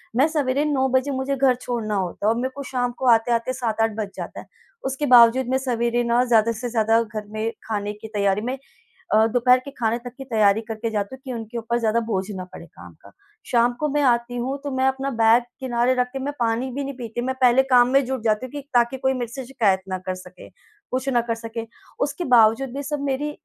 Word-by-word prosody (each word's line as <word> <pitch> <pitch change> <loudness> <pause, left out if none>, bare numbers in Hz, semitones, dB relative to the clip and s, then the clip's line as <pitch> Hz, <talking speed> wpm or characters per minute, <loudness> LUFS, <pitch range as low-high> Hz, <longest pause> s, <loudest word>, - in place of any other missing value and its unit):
मैं 275 +5 +4
सवेरे 290 -2 0
9 265 -3 +1
बजे 260 +2 +1
मुझे 265 +1 -1
घर 260 -2 +3
छोड़ना 225 -4 -2
होता 190 +1 -3
है - - +5
और - - -6
मेरे 260 +1 -1
को 280 - -6
शाम 245 -1 0
को 260 - -1
आते-आते 230 +2 +2
7-8 225 -3 0
बज 210 -2 -3
जाता - - -7
है। - - -10 0.4
उसके 270 +2 -2
बावज़ूद 245 0 +6
मैं 260 - +2
सवेरे 240 -2 0
न 240 +1 +3
ज़्यादा 230 -1 +4
से 240 +2 -4
ज़्यादा 225 0 +2
घर 210 -1 -7
में 215 +1 -2 0.2
खाने 210 -1 -2
की 210 +1 -10
तैयारी 200 0 +1
में 255 +3 -3 0.6
अ, 220 +1 +5
दोपहर 250 +2 +4
के 280 +2 -9
खाने 225 0 +1
तक 245 0 -9
की 270 - -7
तैयारी 215 -4 +3
करके 225 +1 -3
जाती 205 +3 -3
हूँ - - -26
कि 260 - -5
उनके 230 0 -6
ऊपर 235 +1 -1
ज़्यादा 230 0 +1
बोझ 190 -2 0
ना 185 - -5
पड़े - - -10
काम - - -14
का। - - -15 0.4
शाम 240 0 +3
को 300 - +1
मैं 290 +1 0
आती 245 -1 +1
हूँ 260 +3 -2
तो 285 - -3
मैं 260 - +1
अपना 265 +1 -2
बैग 230 0 +4 0.2
किनारे 250 0 +1
रख 250 0 +1
के 270 - -4
मैं 280 +2 -3
पानी 235 +3 0
भी 280 +2 -3
नहीं 275 0 -5
पीती, 240 -1 -5
मैं 260 +2 -2
पहले 255 +1 +5
काम 245 -1 +6
में 275 0 +4
जुट 260 -3 -3
जाती 215 +3 +1
हूँ - - -14
कि 290 - -5
ताकि 240 +2 +3
कोई 265 +1 +1
मेरे 240 -2 -4
से 265 -1 -6
शिकायत 215 -8 +1
ना 185 0 -2
कर 185 - -1
सके, 185 0 -12 0.4
कुछ 260 +2 -2
ना 240 -3 +3
कर 230 -1 -2
सके। 230 0 -6 0.4
उसके 290 +5 -5
बावज़ूद 240 +1 +4
भी 285 - -3
सब 290 0 -3
मेरी 295 +3 -2
240 Hz, 240 wpm, -23 LUFS, 225-265 Hz, 0.6 s, बावज़ूद